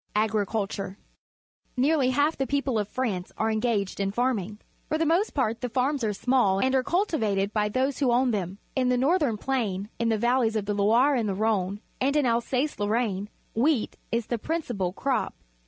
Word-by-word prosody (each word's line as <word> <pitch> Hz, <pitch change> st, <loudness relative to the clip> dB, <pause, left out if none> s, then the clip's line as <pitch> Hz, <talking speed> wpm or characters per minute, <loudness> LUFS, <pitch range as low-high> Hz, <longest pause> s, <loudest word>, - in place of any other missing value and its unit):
Agriculture. 205 Hz, -2 st, -1 dB, 0.4 s
— -, -, -45 dB
N 250 Hz, -, +3 dB
early 280 Hz, -5 st, +3 dB
half 290 Hz, +5 st, +2 dB
the 270 Hz, -, -2 dB
people 280 Hz, -2 st, 0 dB
^ 220 Hz, -, +2 dB
of 205 Hz, -, -5 dB
France 210 Hz, -9 st, -2 dB
are 220 Hz, 0 st, +1 dB
enga 220 Hz, -2 st, +1 dB
ged 190 Hz, -, -11 dB
in 195 Hz, 0 st, 0 dB
farmi 240 Hz, -3 st, 0 dB
ng. 210 Hz, 0 st, -11 dB, 0.3 s
For 310 Hz, -, +1 dB
the 325 Hz, -, +1 dB
most 345 Hz, +7 st, +1 dB
part 230 Hz, -5 st, 0 dB
the 250 Hz, -, -2 dB
farms 265 Hz, +2 st, 0 dB
are 215 Hz, -, +1 dB
small 210 Hz, -2 st, +2 dB
and 260 Hz, +6 st, +1 dB
are 265 Hz, -, +4 dB
cultivated 220 Hz, -, 0 dB
by 210 Hz, -1 st, +1 dB
those 260 Hz, +4 st, 0 dB
who 265 Hz, -4 st, +2 dB
own 250 Hz, +1 st, +3 dB
them. 195 Hz, -3 st, -3 dB, 0.2 s
In 255 Hz, -2 st, +2 dB
the 250 Hz, -, +2 dB
northern 280 Hz, -3 st, +2 dB
plain, 210 Hz, -6 st, -2 dB
in 230 Hz, 0 st, +1 dB
the 220 Hz, -, +2 dB
vaUej's 240 Hz, 0 st, +2 dB
of 210 Hz, -2 st, -1 dB
the 205 Hz, -, -1 dB
Loire 225 Hz, +8 st, +4 dB
and 230 Hz, -5 st, 0 dB
the 195 Hz, -, -1 dB
Rhone, 205 Hz, -1 st, 0 dB, 0.2 s
and 275 Hz, +3 st, +2 dB
in 295 Hz, -2 st, +3 dB
Alsace 250 Hz, +4 st, 0 dB
Lorraine, 205 Hz, -1 st, 0 dB, 0.2 s
wheat 255 Hz, +1 st, +1 dB, 0.2 s
is 230 Hz, -1 st, 0 dB
the 240 Hz, 0 st, -2 dB
principal 240 Hz, -, -2 dB
crop. 260 Hz, +7 st, -1 dB
235 Hz, 205 wpm, -26 LUFS, 210-265 Hz, 0.4 s, are